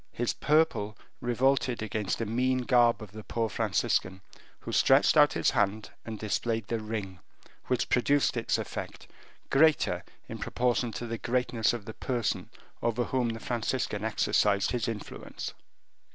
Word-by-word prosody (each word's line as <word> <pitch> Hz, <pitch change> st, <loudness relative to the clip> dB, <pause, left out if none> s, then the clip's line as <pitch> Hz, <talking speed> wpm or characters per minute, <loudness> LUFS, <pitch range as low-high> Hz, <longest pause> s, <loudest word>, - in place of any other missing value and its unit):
His 120 Hz, 0 st, -1 dB
purple 150 Hz, -10 st, +1 dB, 0.2 s
revolted 125 Hz, 0 st, +1 dB
against 105 Hz, -2 st, -2 dB
the 115 Hz, -, -2 dB
mean 125 Hz, +3 st, +1 dB
garb 120 Hz, -3 st, +3 dB
of 105 Hz, -, -11 dB
the 110 Hz, +1 st, -9 dB
poor 115 Hz, 0 st, -2 dB
Franciscan, 95 Hz, -2 st, 0 dB, 0.4 s
who -, -, -6 dB
stretched 135 Hz, +2 st, +5 dB
out 145 Hz, -2 st, +6 dB
his -, -, +2 dB
hand 105 Hz, -2 st, 0 dB
and 110 Hz, -1 st, -6 dB
displayed 110 Hz, +1 st, -1 dB
the 115 Hz, +1 st, -2 dB
ring, 105 Hz, -4 st, -5 dB, 0.5 s
which 125 Hz, -2 st, 0 dB
produced 140 Hz, +3 st, +2 dB
its 115 Hz, -, 0 dB
effect, -, -, -6 dB, 0.4 s
greater 155 Hz, +2 st, +3 dB, 0.2 s
in -, -, -7 dB
proportion 120 Hz, -1 st, 0 dB
to 110 Hz, +5 st, -5 dB
the 115 Hz, -1 st, -4 dB
greatness 120 Hz, -2 st, +1 dB
of 120 Hz, -4 st, -5 dB
the 110 Hz, -, -7 dB
person 120 Hz, -1 st, -2 dB, 0.3 s
over 120 Hz, +1 st, 0 dB
whom 125 Hz, -1 st, 0 dB
the 115 Hz, 0 st, -4 dB
Franciscan 115 Hz, -2 st, -2 dB
exercised 105 Hz, -2 st, +2 dB
his 120 Hz, -3 st, -1 dB
influence. 110 Hz, -3 st, -6 dB
115 Hz, 150 wpm, -29 LUFS, 110-125 Hz, 0.5 s, out